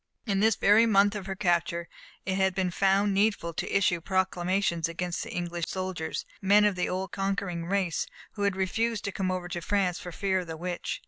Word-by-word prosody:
In 200 Hz, -4 st, 0 dB
this 220 Hz, +1 st, +4 dB
very 215 Hz, +3 st, +5 dB
month 205 Hz, -1 st, +4 dB
of 205 Hz, -2 st, -5 dB
her 190 Hz, -, -3 dB
capture, 170 Hz, -3 st, 0 dB, 0.4 s
it 190 Hz, -, 0 dB
had 190 Hz, -1 st, +1 dB
been 185 Hz, -2 st, 0 dB
found 195 Hz, +2 st, +2 dB
needful 200 Hz, -4 st, +1 dB
to -, -, -3 dB
issue 180 Hz, -3 st, +2 dB
proclamations 185 Hz, -2 st, 0 dB
against 175 Hz, +1 st, -3 dB
English 175 Hz, -1 st, -3 dB
soldiers, 185 Hz, -4 st, -3 dB, 0.2 s
men 205 Hz, +2 st, +5 dB
of 205 Hz, -2 st, +2 dB
the 180 Hz, -, -1 dB
old 185 Hz, 0 st, -3 dB
conquering 195 Hz, -3 st, -2 dB
race, 190 Hz, -3 st, 0 dB, 0.2 s
who 205 Hz, -, -8 dB
had 200 Hz, -1 st, +1 dB
refused 225 Hz, +4 st, -1 dB
to 200 Hz, -, -2 dB
come 190 Hz, -1 st, -2 dB
over 185 Hz, -1 st, -2 dB
to 175 Hz, 0 st, -4 dB
France 185 Hz, -1 st, 0 dB
for 180 Hz, -, -7 dB
fear 190 Hz, +2 st, 0 dB
of 180 Hz, -, -6 dB
the 160 Hz, -1 st, -6 dB
Witch. 175 Hz, +1 st, -4 dB
190 Hz, 200 wpm, -28 LUFS, 175-200 Hz, 0.4 s, very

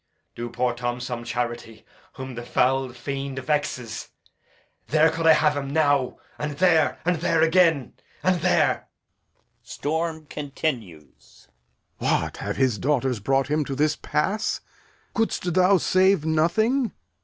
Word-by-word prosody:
Do 120 Hz, 0 st, -5 dB
poor 125 Hz, +1 st, 0 dB
Tom 120 Hz, 0 st, -3 dB
some 120 Hz, -1 st, -5 dB
charity, 120 Hz, -1 st, -4 dB, 0.3 s
whom 130 Hz, -1 st, -7 dB
the 120 Hz, -, -6 dB
foul 130 Hz, +2 st, +1 dB
fiend 135 Hz, +2 st, -5 dB
vexes. 130 Hz, -5 st, -2 dB, 0.8 s
There 155 Hz, +2 st, +4 dB
could 165 Hz, 0 st, -1 dB
I 160 Hz, -, +9 dB
have 150 Hz, -1 st, +3 dB
him 140 Hz, -1 st, -3 dB
now 145 Hz, -4 st, +2 dB, 0.2 s
and 150 Hz, 0 st, -3 dB
there 160 Hz, -3 st, +3 dB
and 175 Hz, -1 st, +2 dB
there 165 Hz, 0 st, +2 dB
again 165 Hz, -5 st, +3 dB, 0.3 s
and 185 Hz, -2 st, +2 dB
there! -, -, +2 dB, 0.7 s
Storm 160 Hz, +1 st, -3 dB
still. 150 Hz, +2 st, -2 dB
Lear. 90 Hz, -10 st, -13 dB, 1.0 s
What, -, -, 0 dB
have -, -, -4 dB
his 130 Hz, -6 st, +1 dB
daughters 130 Hz, -4 st, 0 dB
brought 135 Hz, +5 st, +1 dB
him 150 Hz, 0 st, +2 dB
to 135 Hz, -1 st, -4 dB
this 150 Hz, +2 st, +2 dB
pass? 200 Hz, +8 st, -1 dB, 0.5 s
Couldst 220 Hz, -6 st, -1 dB
thou 185 Hz, +2 st, +5 dB
save 185 Hz, -1 st, +3 dB
nothing? 215 Hz, -, +1 dB
145 Hz, 135 wpm, -24 LUFS, 125-160 Hz, 1.0 s, I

